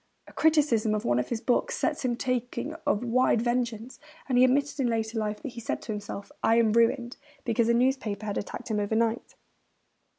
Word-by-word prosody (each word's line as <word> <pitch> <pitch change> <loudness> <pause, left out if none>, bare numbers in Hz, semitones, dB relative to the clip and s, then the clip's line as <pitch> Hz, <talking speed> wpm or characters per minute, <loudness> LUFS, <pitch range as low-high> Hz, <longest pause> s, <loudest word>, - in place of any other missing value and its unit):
A - - -15
criticism 280 -9 +3
of 210 - -3
one 120 0 +2
of 125 - -3
his 230 -2 -2
books 465 - 0
sets - - -1
him 245 -2 0
talking 250 +3 -2
of 210 - +1
wide 245 -1 +2
vengeance; 240 -1 -2 0.3
and 260 - 0
he 250 - +6
admitted 280 +3 +2
in 260 - +2
later 225 -1 -1
life 210 -1 -3
that - - -4
he 235 -1 -9
said - - -2
to - - -5
himself, 205 -1 -6
'I 225 - +3
am 225 -2 +3
ruined,' 235 +1 +2 0.3
because 230 0 +1
a - - +4
newspaper 235 -5 0
had 205 -2 -2
attacked 220 - -7
him 210 - +1
overnight. 225 +2 -1
235 Hz, 200 wpm, -27 LUFS, 220-255 Hz, 0.3 s, he